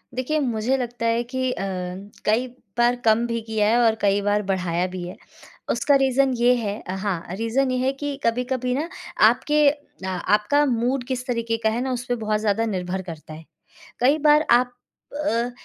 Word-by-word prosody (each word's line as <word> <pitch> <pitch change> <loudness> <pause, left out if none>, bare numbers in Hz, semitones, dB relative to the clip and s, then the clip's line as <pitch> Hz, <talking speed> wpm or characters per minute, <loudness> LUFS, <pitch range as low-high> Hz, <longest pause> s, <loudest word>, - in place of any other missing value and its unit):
देखिए 280 +5 0
मुझे 245 0 0
लगता 240 -2 -4
है 230 +1 +2
कि 255 +1 -2
अ, 195 - -4 0.6
कई 230 +4 +2 0.3
बार 240 +1 +4
कम 225 +2 +4
भी 230 -1 -2
किया 215 -2 +1
है 235 - +3
और 220 -1 +4
कई 200 0 +2
बार 205 +1 +1
बढ़ाया 180 -2 -1
भी 180 -1 -6
है। 180 - -8 0.5
उसका 285 - +2
रीज़न 270 0 +3
ये 245 +1 +4
है 215 -3 -3
हाँ, 190 -4 -3
रीज़न 245 +5 0
ये 255 - 0
है 260 +1 +1
कि 285 +1 -4
कभी-कभी 250 +2 0
ना 310 +5 -2 0.4
आपके 300 -1 +2
अ, 285 -9 -8
आपका 210 +10 +2
मूड 245 0 0
किस 255 -1 -3
तरीके 230 -2 -1
का 220 - +4
है 230 +3 -1
ना 260 0 -2
उसपे 245 0 -2
बहुत 215 -2 -1
ज़्यादा 215 +1 +1
निर्भर 185 -3 -3
करता 160 -3 -9
है। 160 +1 -11 0.6
कई 275 +5 +4
बार 300 +1 +5
आप 245 +1 +4 0.5
अ, 235 -1 0
235 Hz, 185 wpm, -23 LUFS, 210-255 Hz, 0.6 s, बार